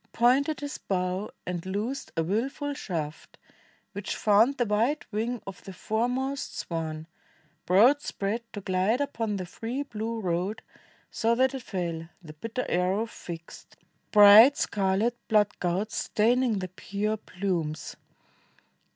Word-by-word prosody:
Pointed 270 +6 +3
his 285 0 -5
bow, 185 +1 -2 0.2
and 175 -2 -3
loosed 210 +8 -3
a 165 - +2
willful 265 - -2
shaft 165 - -5 0.5
Which 200 0 -4
found 220 +6 +4
the 240 - +2
wide 230 +8 +1
wing 225 +2 -2
of 195 -2 -9
the 195 - -9
foremost 250 +8 -2
swan 160 -2 -4 0.6
Broad 235 +11 +5
spread 205 0 -2
to 205 - -5
glide 190 +6 +1
upon 230 -7 -2
the 185 -2 -4
free 235 +9 -4
blue 230 -3 -4
road, 185 +2 -2 0.5
So 230 +1 +1
that 260 +2 +3
it 265 - -4
fell, 170 -6 -4
the 155 -2 -10
bitter 230 +10 -4
arrow 185 +5 +1
fixed, 170 -7 -10 0.3
Bright 210 +6 +9
scarlet 200 +4 +1
blood 210 -2 +2
gouts 190 +5 -1
staining 240 +1 +2
the 185 -1 -4
pure 200 +4 -3
plumes. 175 -6 -3
210 Hz, 135 wpm, -27 LUFS, 185-240 Hz, 0.6 s, Bright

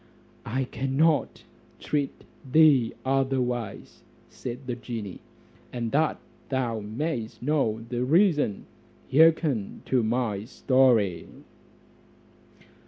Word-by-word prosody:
"I 130 +4 -1
cannot 135 +4 0 0.4
treat 145 -2 -2 0.3
thee 145 -6 +5
otherwise," 130 -5 -1 0.3
said 125 +2 -7
the 125 -1 -3
genie; 115 -5 -6 0.5
"and 120 -2 -3
that 155 +2 +1 0.3
thou 125 -4 -1
mayest 115 +2 -4
know 125 -6 0
the 120 0 -2
reason, 150 - +2 0.5
hearken 150 -7 +3
to 130 -2 +2
my 110 -3 -1
story." 120 -9 +2
130 Hz, 90 wpm, -26 LUFS, 115-140 Hz, 0.5 s, thee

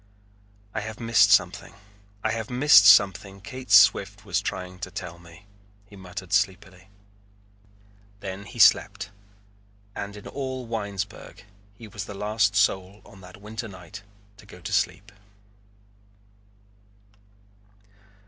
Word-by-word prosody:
"I 110 - -2
have 110 0 -7
missed 115 -4 +4
something. 100 0 +1 0.5
I 110 - 0
have 110 -1 -4
missed 125 -5 +6
something 100 -1 +4
Kate 125 +7 -10
Swift 105 -1 +4
was - - -1
trying 90 0 -6
to 95 - -6
tell 90 -2 -8
me," 85 +3 -17 0.4
he 100 - -16
muttered 95 -1 -9
sleepily. 95 -1 -1 1.3
Then 95 0 -7
he - - -12
slept - - +3 0.8
and 100 +1 -7
in 105 - -12
all 130 -2 -5
Winesburg 105 -3 -6 0.3
he 110 +1 -12
was 100 -1 -7
the 100 - -9
last 105 0 0
soul 95 0 0
on 95 - -16
that 90 0 -13
winter 110 +3 -7
night 90 -1 -11 0.4
to - - -17
go - - -13
to - - -6
sleep. 95 +1 -1
100 Hz, 125 wpm, -25 LUFS, 95-110 Hz, 1.3 s, missed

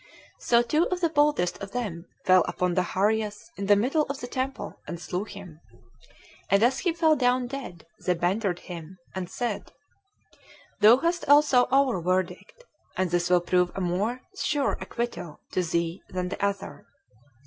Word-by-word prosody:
So 235 0 +3
two 305 +8 +2
of 365 - -2
the 335 -2 +2
boldest 290 - +2
of 195 0 -7
them 190 -8 -4 0.2
fell 185 -2 +6
upon 180 -1 -1
Zacharias 210 +4 0
in 200 0 -4
the 205 - +7
middle 275 +9 +1
of 280 0 -4
the - - -5
temple, 260 +2 -4
and 170 - -5
slew 180 +3 -3
him; 195 -7 -11 0.9
and 200 +2 +4
as 255 +3 +3
he 355 - +1
fell 325 -2 +3
down 250 -2 +2
dead, 240 -11 -7 0.2
they 180 - +2
bantered 180 +1 0
him, 175 +1 -9 0.2
and 185 -2 -4
said, 235 0 -4 1.1
"Thou 220 +3 +8
hast 335 +2 -1
also 285 -4 +6
our 265 -8 +3
verdict, 185 - -2 0.3
and 185 -2 0
this 175 0 +1
will 180 -1 +4
prove 180 0 +2
a - - -3
more 200 +8 -1
sure 290 -7 0
acquittal 235 -10 -5
to 185 - +1
thee 170 +1 -1
than 180 -1 -3
the 200 - -5
other." 200 - -3
205 Hz, 165 wpm, -26 LUFS, 180-260 Hz, 1.1 s, Thou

